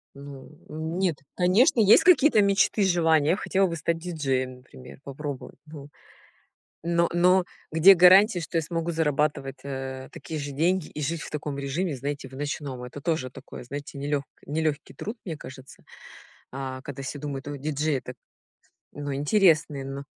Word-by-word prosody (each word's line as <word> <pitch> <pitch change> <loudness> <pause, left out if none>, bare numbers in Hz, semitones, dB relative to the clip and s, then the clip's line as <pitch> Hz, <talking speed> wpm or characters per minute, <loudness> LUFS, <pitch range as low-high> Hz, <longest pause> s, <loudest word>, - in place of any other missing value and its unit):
Ну, 140 -1 -11 0.2
нет, 160 +1 -2 0.2
конечно, 205 - +4
есть 210 -1 +7
какие-то 300 - +5
мечты, 200 +1 +2
желания. 160 -5 +3
Я 180 - +4
хотела 195 -2 +1
бы 170 - -4
стать 165 +1 -1
диджеем, 135 -7 -2
например, 130 0 -14
попробовать, 140 0 -7
ну. 150 -2 -11 1.0
Но, 170 0 +2
но 180 +1 +4 0.3
где 175 +5 +8
гарантия, 185 +2 +6
что 165 0 -2
я - - 0
смогу 165 +1 -3
зарабатывать, 150 -4 0
э, 130 -1 -6
такие 160 - -6
же 145 -1 -5
деньги 170 +4 0
и - - -8
жить 160 +2 -2
в - - -8
таком 150 -2 -4
режиме, 140 +3 -2
знаете, 140 +1 -5
в 130 - -15
ночном. 145 -3 -4
Это 125 +3 -8
тоже 150 -5 -1
такое, - - -11
знаете, 140 +3 -7
нелегк 145 0 -2 0.2
нелегкий 150 -2 -2
труд, 215 - -6
мне 165 -5 -5
кажется, 130 -1 -12 0.7
а, 130 -1 -5
когда 135 0 -8
все 140 +2 -5
думают: 140 -1 -6
"О, 145 - -4
диджей 150 0 -1
это" 125 - -8 0.8
Ну, 145 -1 -5
интересный, 155 -2 +2
но. 135 +1 -6
150 Hz, 160 wpm, -26 LUFS, 140-170 Hz, 1.0 s, где